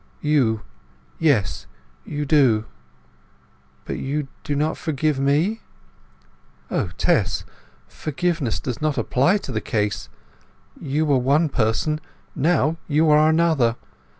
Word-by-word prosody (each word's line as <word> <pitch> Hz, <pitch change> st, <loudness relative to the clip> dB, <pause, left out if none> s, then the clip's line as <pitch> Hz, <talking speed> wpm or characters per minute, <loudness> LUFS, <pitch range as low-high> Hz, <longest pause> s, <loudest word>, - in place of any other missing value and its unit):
"You—yes, 105 Hz, -, -1 dB, 0.4 s
you 150 Hz, 0 st, -3 dB
do." 130 Hz, -7 st, +3 dB, 1.2 s
"But -, -, -4 dB
you 140 Hz, +1 st, -3 dB
do 145 Hz, -, -2 dB
not 150 Hz, +2 st, 0 dB
forgive 155 Hz, -2 st, -1 dB
me?" 155 Hz, +11 st, +1 dB, 1.1 s
"O -, -, 0 dB
Tess, -, -, +1 dB, 0.4 s
forgiveness 155 Hz, -, -2 dB
does 125 Hz, -3 st, -5 dB
not 155 Hz, -2 st, 0 dB
apply 170 Hz, +11 st, +2 dB
to 170 Hz, -, -7 dB
the 110 Hz, -3 st, -2 dB
case! 105 Hz, -2 st, -2 dB, 0.7 s
You 150 Hz, +3 st, 0 dB
were 140 Hz, -3 st, +3 dB
one 145 Hz, +6 st, +2 dB
person; 135 Hz, +6 st, 0 dB, 0.3 s
now 160 Hz, +1 st, +2 dB
you 155 Hz, +1 st, +3 dB
are 155 Hz, +1 st, +5 dB
another. 160 Hz, -8 st, +3 dB
145 Hz, 110 wpm, -22 LUFS, 120-155 Hz, 1.2 s, are